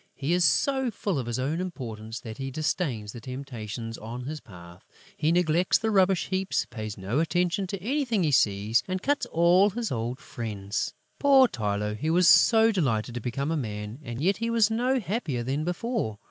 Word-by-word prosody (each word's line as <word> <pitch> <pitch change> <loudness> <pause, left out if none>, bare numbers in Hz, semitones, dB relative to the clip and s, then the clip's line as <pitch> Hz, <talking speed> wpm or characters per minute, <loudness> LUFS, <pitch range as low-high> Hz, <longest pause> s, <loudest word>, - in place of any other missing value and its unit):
He 145 +5 -1
is 180 0 +3
so 265 +5 +2
full 200 -7 -2
of 120 - -4
his 120 0 -2
own 145 +7 -1
importance 115 -10 -6
that 110 -3 -8
he 135 0 -3
disdains 135 - -2
the 120 - -9
temptations 115 -3 -6
on 120 +3 -7
his 150 +4 -5
path: 90 -6 -14 0.3
he 155 - +1
neglects 175 0 +3
the 220 0 -1
rubbish 190 -2 +3
heaps, 190 0 0
pays 110 -2 -6
no 100 +8 -1
attention 175 +4 0
to 195 +1 -4
anything 235 -1 0
he 155 - +2
sees 105 -2 +3
and 185 0 -3
cuts 290 +1 0
all 175 +4 +4
his 225 +2 -3
old 120 +1 -2
friends. 105 -5 -4 0.2
Poor 275 -2 +6
Tylô! 105 - -2
He 150 +9 -2
was 175 +1 +4
so 225 +4 +6
delighted 125 - 0
to 120 - -4
become 135 +6 -2
a - - +1
man; 105 -3 -5
and 120 -1 -6
yet 195 +3 +2
he 230 +1 -2
was 225 -2 +3
no 250 +4 +1
happier 175 - -2
than 135 +5 -1
before! 180 - -2
150 Hz, 190 wpm, -27 LUFS, 115-190 Hz, 0.3 s, Poor